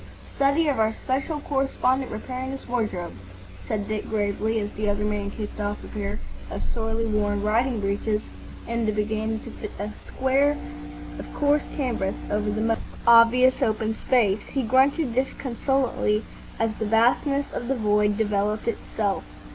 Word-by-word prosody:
"Study 280 +4 +3
of 280 -5 +1
our 220 0 +2
Special 275 +4 -2
Correspondent 270 -2 0
repairing 255 +4 -4
his 270 0 -6
wardrobe," 215 -8 -2 0.5
said 205 -1 -2
Dick, 215 -1 -3
gravely, 215 +1 0
as 205 0 -3
the 210 0 -1
other 205 0 0
man 205 -1 -1
kicked 210 +1 -6
off 205 0 -3
a - - -8
pair 205 0 -4 0.3
of - - -4
sorely 225 0 -2
worn 205 -2 0
riding 230 +3 +2
breeches 210 +2 0 0.4
and 230 -2 0
began 220 +1 -1
to - - -8
fit 210 - -7
a 205 +1 -4 0.2
square 275 +3 +2 0.6
of - - -8
coarse 290 0 +2
canvas 240 -9 -1 0.2
over 210 0 +1
the 215 +1 -1
most 225 0 +1 0.3
obvious 235 +2 +6
open 220 0 +1
space. 220 -4 +2
He 270 - 0
grunted 260 +3 +3
disconsolately 255 -3 0 0.3
as 225 -1 +1
the 220 - -1
vastness 250 +6 +3
of 240 - -4
the 270 - +1
void 210 -2 +2
developed 210 0 0
itself. 210 -3 -1
225 Hz, 155 wpm, -25 LUFS, 210-260 Hz, 0.6 s, obvious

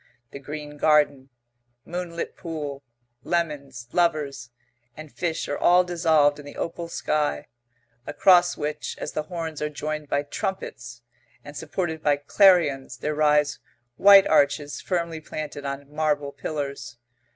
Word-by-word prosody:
The 140 - -8
green 150 +1 -8
garden, 145 -3 +2 0.6
moonlit 175 -1 -5
pool, 150 -5 -6 0.4
lemons, 140 -8 -3
lovers, 145 -7 0 0.5
and 155 -1 -10
fish 165 -2 -3
are 145 - -3
all 180 +1 +5
dissolved 160 -4 +2
in 145 - -10
the 145 - -10
opal 170 0 -4
sky, 150 -3 -1 0.6
across 175 +3 +4
which, 150 0 -4
as - - -5
the - - -2
horns 165 -4 -5
are 150 - -1
joined 150 0 -5
by 145 - +1
trumpets 120 -7 -5 0.4
and 145 0 -11
supported 160 +1 -3
by 145 -2 +3
clarions 150 -3 +3
there 150 - -2
rise 150 -1 +2 0.4
white 200 +3 +8
arches 145 -1 +2
firmly 170 -3 -2
planted 150 -2 -6
on 140 +1 -6
marble 150 -2 0
pillars.... 140 -5 -5
150 Hz, 130 wpm, -25 LUFS, 145-165 Hz, 0.6 s, white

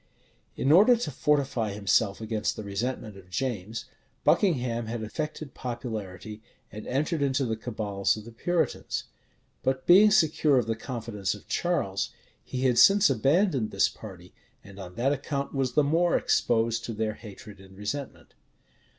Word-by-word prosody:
In 135 - +1
order 210 +9 +7
to 235 -9 -3
fortify 130 -6 0
himself 100 +1 +1
against 110 -1 -2
the 110 - -6
resentment 105 +1 -4
of 95 -2 -15
James, 110 0 -3 0.4
Buckingham 125 - +2
had 115 0 -4
affected 150 +5 -5
popularity, 110 -4 -6 0.3
and 105 +2 -8
entered 150 +4 -1
into 135 0 +1
the 115 -2 -1
cabals 110 -3 -1
of 110 - -9
the 115 - -10
Puritans: 175 +9 -1 0.6
but, 130 0 -1
being 195 +5 +7
secure 155 -7 +3
of 120 - +2
the 115 0 -1
confidence 110 -5 -4
of 105 - -15
Charles, 130 - -1 0.3
he 130 - -5
had 125 -3 +3
since 195 +4 +6
abandoned 135 - +2
this - - +2
party; - - -12 0.3
and 100 0 -13
on 90 -2 -9
that 135 +4 +1
account 140 0 -3
was 135 -3 -1
the 150 - +4
more 165 +4 +2
exposed 115 0 +1
to 115 - -4
their 110 0 -2
hatred 105 -2 -12
and 95 0 -15
resentment. 130 +7 -6
120 Hz, 155 wpm, -27 LUFS, 105-140 Hz, 0.6 s, order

